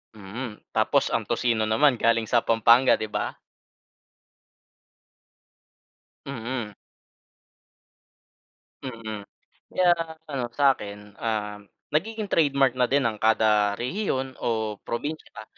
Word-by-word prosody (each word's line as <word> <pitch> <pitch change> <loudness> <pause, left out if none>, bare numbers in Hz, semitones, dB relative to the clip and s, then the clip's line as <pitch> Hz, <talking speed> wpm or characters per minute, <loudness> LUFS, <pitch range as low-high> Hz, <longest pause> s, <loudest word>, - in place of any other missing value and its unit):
Mm. 105 +3 -7
Tapos - - +2
ang - - -1
tocino 115 -3 +1
naman 125 +3 +3
galing 115 -1 +2
sa 120 - +4
Pampanga, 115 +3 +5
'di 110 -1 -5
ba? 105 0 -2 2.9
Mm. 120 -4 -4 2.1
Mm. 110 -5 -6 0.5
Kaya 180 -1 +3 0.4
ano 130 -4 -2
sa 140 -1 +4
akin, 105 0 -10
um, 105 -2 -2 0.3
nagiging 210 +7 -1
trademark 140 -6 +3
na 125 - +4
din 140 0 +2
ng 115 -3 0
kada 105 -1 +3
rehiyon 130 - -2
o 110 -3 -2
probinsiya 130 -3 -5
115 Hz, 100 wpm, -25 LUFS, 110-135 Hz, 2.9 s, Pampanga